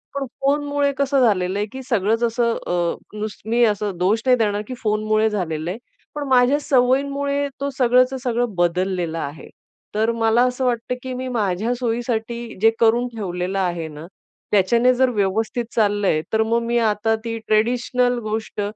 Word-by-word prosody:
पण 280 -1 -2 0.2
फोनमुळे 285 0 +1
कसं 280 0 +2
झालेलं 190 -3 +1
आहे, 205 - 0
की 265 - -7
सगळंच 225 -1 0
असं 235 0 +1
अ, 175 -1 0 0.2
नुस 210 0 -5
मी 235 +2 +2
असं 205 -3 -1
दोष 195 +6 +1
नाही 255 -1 +5
देणार, 210 -2 0
की 255 - -5
फोनमुळे 215 0 +1
झालेलं 170 -6 -3
आहे. 195 - -5 0.4
पण 290 -1 -4
माझ्या 260 +2 +4
सवयींमुळे 280 +1 +1
तो 280 - 0
सगळंचं 255 +1 +3
सगळं 240 -2 -1
बदललेला 175 -1 0
आहे. 145 +3 -9 0.5
तर 220 +2 +2
मला 225 +1 +3
असं 250 +1 -2
वाटतं, 245 0 -1
की 260 -1 -4
मी 255 +1 -4
माझ्या 215 -2 -1
सोयीसाठी 235 -1 -3
जे 225 - +7
करून 235 +2 +3
ठेवलेलं 185 -2 -3
आहे 175 -3 -1
ना, 150 +1 -10 0.5
त्याच्याने 235 +6 +4
जर 260 +1 +3
व्यवस्थित 220 +2 -1
चाललं 205 -2 +2
आहे. 155 - +2
तर 220 - +3
मग 230 +1 +1
मी 235 +1 0
आता 225 -1 +1
ती 230 0 -3
ट्रेडिशनल 245 +3 +1
गोष्ट 215 0 -3
225 Hz, 165 wpm, -21 LUFS, 205-250 Hz, 0.5 s, जे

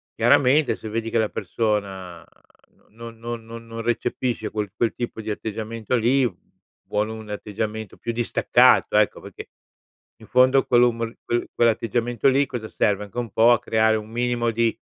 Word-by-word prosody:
chiaramente, 140 +3 +4
se 110 - -8
vedi 115 +1 -3
che - - 0
la 110 -1 +1
persona 95 -6 -3 0.7
non 115 +1 -11
non 115 0 -6
non 115 0 -10
non 115 0 -6
recepisce 120 -1 -2
quel 105 -3 -3
quel 115 +1 0
tipo 120 -2 -5
di 110 0 -4
atteggiamento 110 +2 -4
lì, 125 +2 +2 0.6
vuole 105 +1 -1
un 110 -1 -9
atteggiamento 105 0 -5
più 115 - -4
distaccato, 120 0 +3
ecco, - - +2
perché, - - -10 0.7
in - - -16
fondo, 130 +2 +4
quel 120 -1 +4
umor 115 -1 0
quel 120 0 -1
quell'atteggiamento 115 +1 +1
lì 135 +2 +3
cosa 120 -4 -5
serve? 105 0 0
Anche 100 - -14
un 115 -4 -4
po' 115 +2 +5
a 120 - +2
creare 110 -2 +2
un 110 0 -8
minimo 120 0 0
di 115 0 0
115 Hz, 165 wpm, -23 LUFS, 110-120 Hz, 0.7 s, po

